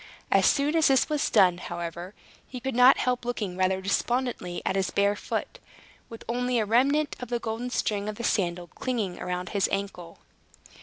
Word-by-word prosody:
As - - +5
soon 290 +2 +2
as 320 -1 +4
this 270 +1 +3
was 300 -1 0
done, 185 -5 +4
however, 175 +3 -6 0.3
he 255 - -7
could 265 +1 -3
not 250 +2 +7
help 250 -1 0
looking 215 -6 -3
rather 185 0 +1
despondently 230 -2 -1
at 190 - 0
his 195 -1 0
bare 200 +1 +2
foot, - - -4 0.5
with 230 - -10
only 245 +1 0
a 220 - +1
remnant 275 +7 +2
of 250 - -7
the 240 - 0
golden 230 +1 -4
string 210 -4 -1
of 215 - -5
the 235 - -7
sandal 180 -6 0
clinging 210 0 -3
round 180 +1 -4
his 200 -3 0
ankle. 180 -4 -4
220 Hz, 185 wpm, -27 LUFS, 185-250 Hz, 0.5 s, not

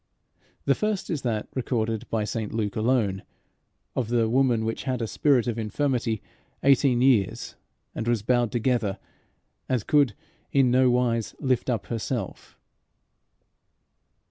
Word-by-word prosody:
The 140 - +4
first 210 +3 -2
is 155 -5 -2
that, 110 -4 -2
recorded 115 -4 -2
by 110 -2 0
St 110 0 -3
Luke 105 -3 -2
alone, 110 -4 +1 0.7
of 125 -4 -1
the 115 -1 +2
"woman 120 -2 +2
which 115 - -3
had 130 -2 -1
a 115 - -1
spirit 130 +1 +2
of 120 -2 -2
infirmity 115 -1 -1 0.4
eighteen 135 -2 +4
years, 115 -8 +2 0.4
and 115 - -4
was 120 -3 +1
bowed 120 0 +2
together, 120 -4 0 0.7
and 125 -5 0
could 140 -8 +3 0.4
in 135 -3 +4
no 130 0 +4
wise 120 -2 0
lift 130 -3 0
up 115 -5 -1
herself." 115 -2 -4
120 Hz, 135 wpm, -26 LUFS, 110-130 Hz, 0.7 s, The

